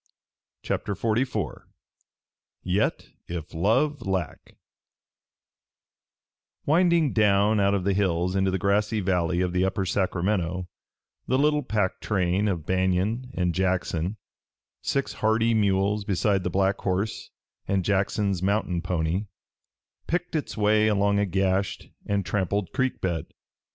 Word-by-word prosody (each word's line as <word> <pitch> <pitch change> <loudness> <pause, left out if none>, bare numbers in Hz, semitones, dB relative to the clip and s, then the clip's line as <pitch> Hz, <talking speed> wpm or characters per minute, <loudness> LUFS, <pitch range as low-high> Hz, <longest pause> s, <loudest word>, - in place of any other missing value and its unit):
CHAPTER 100 - -2
XLIV 110 - -1 1.0
YET 95 +4 0 0.2
IF 85 -3 -6
LOVE 125 - +1
LACK 95 -6 -4 2.1
Winding 170 -1 +3
down 105 0 +3
out 100 0 +3
of 95 - -1
the 100 +1 +1
hills 90 -2 0
into 95 0 +2
the 95 - 0
grassy 105 +3 +1
valley 90 -2 +1
of 90 -1 -1
the 90 0 +2
Upper 95 0 0
Sacramento, 90 -1 -1 0.6
the 130 - +2
little 150 +1 +3
pack 105 -8 -1
train 95 +1 0
of 85 -6 -2
Banion 95 +7 0
and 90 -1 0
Jackson, 95 +1 -1 0.6
six 140 - -1
hardy 110 +1 +2
mules 100 -1 +2
beside 100 0 +1
the 90 - -1
black 95 +2 +1
horse 100 +3 -2 0.4
and 95 -2 0
Jackson's 100 -1 0
mountain 95 -3 0
pony, 90 +2 -1 0.8
picked 175 0 -2
its 150 - -3
way 105 +1 +3
along 100 -1 +2
a 100 - +1
gashed 95 +1 -1 0.2
and 100 -2 0
trampled 95 +1 -1
creek 130 -1 -1
bed. 85 -3 -2
100 Hz, 125 wpm, -26 LUFS, 90-105 Hz, 2.1 s, Winding